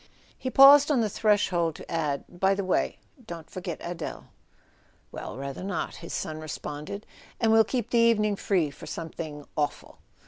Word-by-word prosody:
He 260 - -4
paused 280 +2 +8
on 275 -5 +3
the 215 - +1
threshold 185 -7 +2
to - - -11
add: 150 -4 -1
"By 190 +2 +1
the 200 - -2
way, 185 - 0 0.3
don't 165 -4 -8
forget 180 -3 -5
Adele." 175 0 -6 0.8
"Well, - - -7
rather 140 +2 -5
not," 200 +1 -3
his 170 - -9
son 155 0 -3
responded. 155 +5 -6 0.3
"And 225 -2 +3
we'll 225 0 +7
keep 245 +2 -3
the 235 - +4
evening 215 -3 +3
free 180 -7 0
for - - -12
something 160 -3 -6
awful." 150 -1 -3
180 Hz, 165 wpm, -27 LUFS, 155-220 Hz, 0.8 s, paused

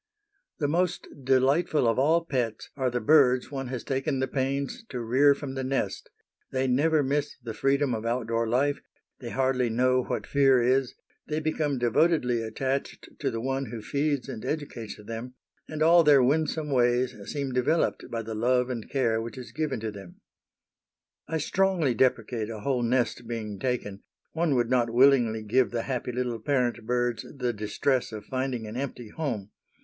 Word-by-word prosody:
The 150 -6 0
most 175 +3 0 0.2
delightful 135 +2 +3
of 115 +2 +2
all 165 +5 +3
pets 120 -7 -2
are 130 -2 0
the 120 0 -1
birds 130 0 +4
one 135 -2 -4
has 125 -1 -5
taken 135 +1 -1
the 130 - 0
pains 140 - -2
to 125 - -4
rear 130 +5 +4
from 140 -2 -6
the 135 0 -3
nest; 135 +1 -2 0.4
they 130 0 0
never 145 +4 +3
miss 145 +2 -1
the 115 -2 -5
freedom 135 +2 +1
of 110 -1 -3
outdoor 115 -1 -1
life, 140 +4 +1 0.4
they 120 - -7
hardly 130 -1 +1
know 125 +2 +2
what - - -3
fear 135 -2 +4
is, 130 +1 +1 0.3
they 155 0 -1
become 155 -2 -1
devotedly 125 0 +2
attached 130 +5 -3
to - - 0
the 115 - -3
one 135 +2 -2
who 115 +1 -6
feeds 140 +4 -1
and 120 -5 -7
educates 130 -8 -4
them, 115 +4 -7 0.3
and 155 0 -1
all 170 +1 +6
their 145 -4 +6
winsome 150 +2 0
ways 125 0 +2 0.2
seem 140 -3 -3
developed 125 +6 0
by 115 -1 -3
the 110 +1 -6
love 125 +3 +1
and 115 -3 -5
care 115 -5 +1
which 115 +3 -7
is 125 - -8
given 150 -6 -2
to 110 -1 -3
them. 95 -4 -11 1.1
I 160 - -1
strongly 175 -3 +1
deprecate 115 -2 0
a 110 -2 -6
whole 130 +1 0
nest 120 0 0
being 110 -4 -5
taken; 105 -5 -3 0.3
one 160 -3 +1
would 120 -1 +1
not 120 -2 +3
willingly 120 -3 +4
give 125 +4 +2
the 115 -1 -2
happy 125 -2 -3
little 120 -1 -2
parent 120 -2 0
birds 120 -2 0
the 125 -2 -1
distress 110 +5 -1
of 105 -2 -7
finding 130 -3 -2
an 105 +1 -7
empty 125 -3 -5
home. 115 -9 -4
130 Hz, 175 wpm, -27 LUFS, 115-140 Hz, 1.1 s, all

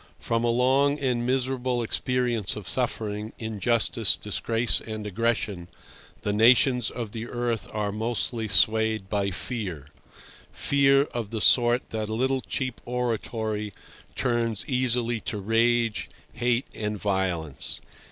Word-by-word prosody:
From 115 0 -1
a 120 - +2
long 135 +4 +3
and 125 -4 0
miserable 130 -1 0
experience 120 -5 0
of 105 -3 -7
suffering, 110 -3 -2
injustice, 110 0 +1
disgrace 115 +3 0
and 110 -1 -6
aggression 105 -3 -1 0.6
the 105 - 0
nations 125 +2 +5
of 115 -4 -5
the 115 +1 -5
earth 120 -2 -2
are 105 -1 -1
mostly 115 +1 -1
swayed 110 0 +2
by 100 -1 0
fear—fear 115 - -1
of 120 -7 -5
the 110 0 -3
sort 120 +2 +4
that 110 -1 -3
a 110 - -2
little 130 +2 +1
cheap 130 -2 -3
oratory 110 -4 -2 0.4
turns 115 -3 0
easily 125 -2 +1
to 105 - -4
rage, 115 +2 +1 0.2
hate, 120 +2 +1
and 105 -1 -3
violence. 95 -7 -2
115 Hz, 125 wpm, -26 LUFS, 105-125 Hz, 0.6 s, nations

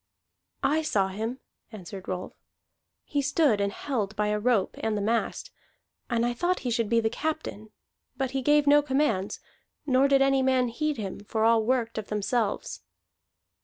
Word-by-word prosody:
"I 295 +4 +2
saw 200 -11 +1
him," 225 +6 -4 0.3
answered 195 -2 -9
Rolf. 185 0 -4 0.7
"He 290 - -1
stood 280 -6 +2
and 200 0 0
held 215 -4 -3
by 210 0 0
a 210 0 0
rope 225 -3 +1
and 220 -1 -1
the - - -1
mast, 230 - -1 0.6
and 235 -1 +1
I 240 - 0
thought 350 +9 0
he 245 - -2
should 230 -2 0
be 230 0 +4
the 225 - +1
captain; 260 -6 -4 0.5
but 265 -2 -1
he 270 0 -1
gave 295 +2 +4
no 290 +1 +6
commands, 265 -9 0 0.5
nor 265 0 +4
did 275 -1 +4
any 270 0 +3
man 260 -2 +2
heed 305 +5 -2
him, 200 -4 -5
for 220 +1 -1
all 225 0 +4
worked 230 -1 0
of 215 - -7
themselves." 210 +1 -1
235 Hz, 170 wpm, -27 LUFS, 210-275 Hz, 0.7 s, no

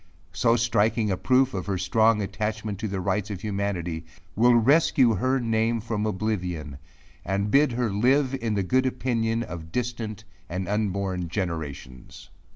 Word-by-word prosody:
So 115 +4 +3
striking 115 -2 +1
a - - +1
proof 130 +5 +2
of 95 - -4
her 100 -2 -1
strong 110 +3 +3
attachment 105 0 -3
to 110 - -2
the 100 -1 -3
rights 95 +2 -1
of 100 -3 -5
humanity, 100 -6 -3 0.3
will 120 +3 +5
rescue 125 - +4
her 130 +6 +1
name 115 0 +1
from 110 -1 -2
oblivion, 90 -9 -3 0.4
and 100 +2 -1
bid 140 -2 +4
her 120 -2 0
live 130 +6 +2
in 115 -2 -1
the 100 - 0
good 130 +7 +2
opinion 115 -3 -1
of 80 -6 -8
distant 115 -2 -3 0.3
and 90 +1 -3
unborn 100 -4 -1
generations. 80 -2 -6
105 Hz, 155 wpm, -25 LUFS, 95-115 Hz, 0.4 s, will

